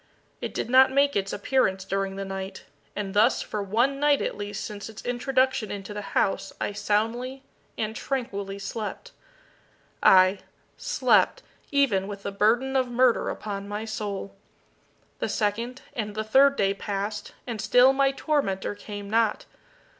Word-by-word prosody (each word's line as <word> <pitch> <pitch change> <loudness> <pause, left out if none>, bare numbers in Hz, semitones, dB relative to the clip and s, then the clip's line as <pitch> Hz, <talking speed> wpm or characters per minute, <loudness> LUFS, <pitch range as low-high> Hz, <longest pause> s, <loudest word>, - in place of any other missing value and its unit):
It - - -5
did - - -2
not 260 +2 +6
make 280 +1 +3
its 195 -1 0
appearance 195 -4 0
during 195 0 -2
the 195 0 -4
night 195 0 -6 0.3
and 200 -2 -4
thus 215 +5 +3
for 210 - -4
one 240 +8 +1
night 290 -1 +4
at - - -2
least 205 0 -5
since 210 0 -7
its 220 - -11
introduction 255 -1 +1
into 200 +1 -6
the 210 - -4 0.2
house 195 - +1
I - - -1
soundly 225 +6 -1 0.3
and 220 0 -2
tranquilly 200 -8 -3
slept, 215 - -6 0.9
aye, 185 +1 +6 0.4
slept - - +2 0.3
even 245 -10 +2
with 200 -1 -7
the 200 - -3
burden 235 +7 +2
of 260 -1 +2
murder 245 0 +2
upon 200 -1 -5
my 210 +2 -4
soul! 205 -3 -5 0.8
The - - -1
second 230 +4 -2
and 210 -3 -4
the 215 - -1
third 275 +6 +5
day 195 -5 +2
passed, 205 +1 -4
and 230 -4 -4
still 250 +2 +5
my 275 0 +3
tormentor 270 -11 -1
came 205 0 -8
not. 225 +1 +1
215 Hz, 155 wpm, -26 LUFS, 200-255 Hz, 0.9 s, not